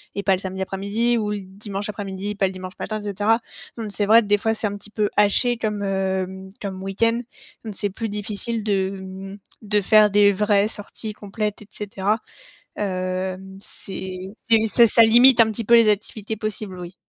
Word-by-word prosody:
et 200 - -2
pas 195 - +3
le - - +1
samedi 190 0 -5
après-midi 200 +5 0
ou 210 -2 -2
le 205 - -3
dimanche 200 +2 -6
après-midi, 200 0 -5
pas 195 - +1
le 190 - -1
dimanche 185 0 -8
matin 215 -1 -4
et - - -12
cetera, 210 +3 +1 0.4
donc 220 -2 -5
c'est 205 +1 -1
vrai 225 +3 +6
que, 210 - -7
des 205 0 +4
fois 225 +2 0
c'est 220 - -1
un 205 0 -5
petit 210 - -9
peu 210 -1 0
haché 210 +4 +6
comme, 210 -3 -3
hem, 190 0 -3
comme 190 -2 -6
week-end, 230 +4 0 0.5
donc 215 - -5
c'est 205 0 -1
plus 220 +3 -5
difficile 210 +2 -2
de, 195 -3 0
hem, 190 +1 -9 0.2
de 210 0 +1
faire 215 +1 +5
des 205 0 +5
vraies 205 0 +2
sorties 215 0 -4
complètes 210 0 -5
et - - -19
cetera. 210 +1 -2 0.6
Hem, 185 0 -4
c'est 190 -2 -7 0.3
c'est 225 -1 +3
ça 235 +2 +5
ça 230 - +4
limite 240 +3 +6
un 220 - +4
petit 230 +2 -1
peu 235 - +2
les 230 -2 +6
activités 210 +1 -2
possibles, 210 -3 -4
oui. 175 +1 -9
205 Hz, 200 wpm, -22 LUFS, 190-215 Hz, 0.6 s, vrai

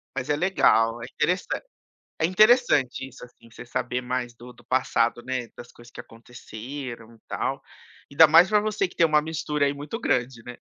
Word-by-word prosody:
Mas 130 - -4
é 145 - +2
legal, 120 -10 +2
é - - -6
interessan 175 +8 -2 0.6
é 160 - +3
interessante 185 - +3
isso, 130 - -13
assim, 120 -1 -19
você 115 - -11
saber 125 0 -3
mais 125 -1 -4
do 125 +1 -13
do - - -21
passado, 120 -2 0
né, 130 -2 -3
das 120 - -11
coisas 120 0 -17
que - - -9
aconteceram 115 +1 -10
e 115 - -21
tal. - - -3 0.5
Ainda 155 +3 +7
mais 165 +5 +6
pra 215 - +3
você 210 -2 -1
que - - -20
tem 165 - +4
uma 150 -1 +2
mistura 150 -2 -2
aí 140 - 0
muito 145 +11 -7
grande, 125 - -1
né. 125 0 -10
130 Hz, 190 wpm, -24 LUFS, 120-160 Hz, 0.6 s, Ainda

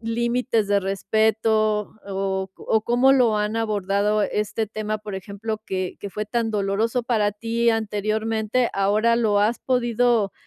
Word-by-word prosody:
límites 235 -1 0
de 200 0 +3
respeto, 215 +2 +1 0.2
o 190 -1 -2
o 220 - 0
cómo 245 +4 +4
lo 240 -5 +3
han 210 +1 -1
abordado 210 -1 0
este 210 +2 -1
tema, 215 0 -3
por 210 -1 -7
ejemplo, 205 +3 -5
que 185 -1 -3
que 200 - -5
fue 210 +3 -4
tan 230 +1 -1
doloroso 210 +4 0
para 215 -4 +1
ti 230 +3 -1
anteriormente. 220 +2 -1
Ahora, 210 +4 +2
¿lo 210 -3 +2
has 220 +3 +1
podido 240 -4 +1
215 Hz, 145 wpm, -23 LUFS, 205-230 Hz, 0.2 s, cómo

